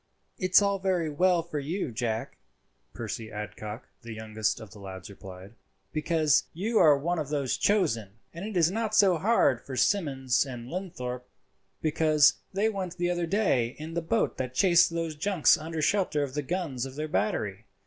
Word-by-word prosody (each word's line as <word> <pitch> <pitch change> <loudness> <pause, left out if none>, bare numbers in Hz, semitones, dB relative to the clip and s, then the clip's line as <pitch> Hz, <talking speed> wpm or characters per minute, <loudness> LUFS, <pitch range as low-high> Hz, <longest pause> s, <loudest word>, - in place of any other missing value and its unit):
"It's 185 0 +5
all 200 -1 +1
very 180 -5 0
well 175 +2 +2
for 155 -3 -4
you, 155 +1 -3
Jack," 115 -1 -3 0.5
Percy 110 -1 -6
Adcock, 105 +1 -7
the 115 -2 -8
youngest 110 -1 -2
of 110 -3 -11
the 105 - -13
lads, 95 -1 -9
replied, 95 0 -11 0.4
"because 155 -1 +2
you 215 +7 0
are 150 -4 +6
one 170 +4 -1
of 150 -3 -4
those 140 -4 0
chosen; 130 - +1 0.2
and 170 +2 -7
it 210 -2 -3
is 170 0 +4
not 220 +1 -1
so 185 -5 +5
hard 190 - +3
for 135 - -7
Simmons 135 -8 +1
and 125 -4 -8
Linthorpe, 125 -9 -5 0.5
because 155 -1 +4
they 200 +3 +1
went 190 -4 -4
the 175 0 0
other 175 -1 -1
day 150 - +1
in 155 +2 -7
the 170 - -1
boat 160 -8 0
that 130 -1 -4
chased 175 0 +5
those 165 -2 -3
junks 175 +1 +3
under 160 0 -4
shelter 160 -3 +1
of 135 -2 -5
the 150 - -1
guns 145 -5 -3
of 130 - -11
their 155 +1 -3
battery. 105 -3 -2
155 Hz, 180 wpm, -28 LUFS, 120-180 Hz, 0.5 s, are